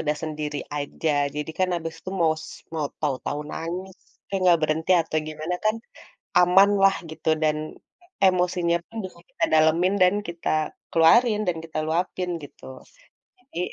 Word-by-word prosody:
udah 150 0 0
sendiri 150 -2 -4 0.2
aja, 145 +2 -2 0.2
jadi 150 +1 -4
kan 185 -1 +2
abis 165 -1 -5
itu 185 - -7
maus 155 -1 +1 0.3
mau 155 -2 -1
tahu-tahu 145 0 -2
nangis, 180 +3 -5 0.2
tapi - - -10
gak 170 -1 +6
berhenti 155 +2 0
atau 160 -1 -3
gimana 155 +3 -4
kan 215 +1 +3 0.7
aman 180 +3 +6
lah 195 0 +6
gitu, 160 0 -3
dan 155 0 +2 0.7
emosinya 180 -2 +2
pun 225 - -19
bisa 185 -2 -9
kita - - -4
dalemin 160 +4 +4
dan 185 +1 +6
kita 170 0 -4 0.4
keluarin 210 +7 +5
dan 175 -2 0
kita 160 -1 -7
luapin 180 +2 -1
gitu. 145 - -13 0.8
Jadi 245 -8 -9
165 Hz, 150 wpm, -24 LUFS, 155-185 Hz, 0.8 s, gak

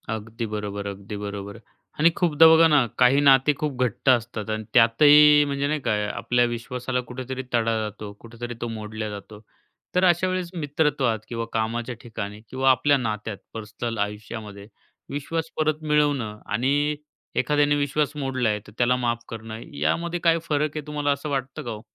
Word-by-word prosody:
अगदी 115 +2 -6
बरोबर 100 -1 -4
अगदी 100 +1 -7
बरोबर 100 0 -6 0.4
आणि 165 +2 +6
खूपदा 165 -3 +6
बघा 160 0 +7
ना, 150 -5 +4
काही 130 +2 +5
नाते 140 +1 +5
खूप 150 -3 -2
घट्ट 125 +2 -1
असतात 115 -3 +1
आणि 110 0 -2
त्यातही 150 +5 +7
म्हणजे 140 0 -1
नाही 150 +1 -1
का, - - -1 0.2
आपल्या 120 0 +1
विश्वासाला 125 +2 -3
कुठेतरी 130 +1 -5
तडा 115 -1 +2
जातो, 105 -1 -6
कुठेतरी 120 +1 -8
तो 120 - -2
मोडला 110 -1 -5
जातो 105 +1 -9 0.6
तर 180 - +3
अशा 175 +1 +3
वेळेस 185 -1 -2
मित्रत्वात 145 -7 0
किंवा 115 -1 -4
कामाच्या 115 +2 -2
ठिकाणी 105 -2 -7
किंवा 130 +1 +1
आपल्या 140 +2 +3
नात्यात 110 -4 -3 0.2
पर्सनल 110 +1 -5
आयुष्यामध्ये 105 0 -5 0.4
विश्वास 160 +3 -3
परत 155 0 +1
मिळवणं 145 -8 +1
आणि 140 +7 +1 0.4
एखाद्याने 145 +2 +2
विश्वास 145 +1 0
मोडला 135 -5 -1
आहे, 105 -1 0
तर - - -12
त्याला 125 +1 +3
माफ 120 -2 -1
करणं 110 -1 -7 0.2
यामध्ये 170 - -1
काय 165 -1 +4
फरक 150 -1 -1
आहे, 150 - -5
तुम्हाला 145 -1 -1
असं 140 +2 -3
वाटतं 135 -1 -3
का 120 - -5
हो? 105 -1 -7
125 Hz, 165 wpm, -24 LUFS, 110-145 Hz, 0.6 s, बघा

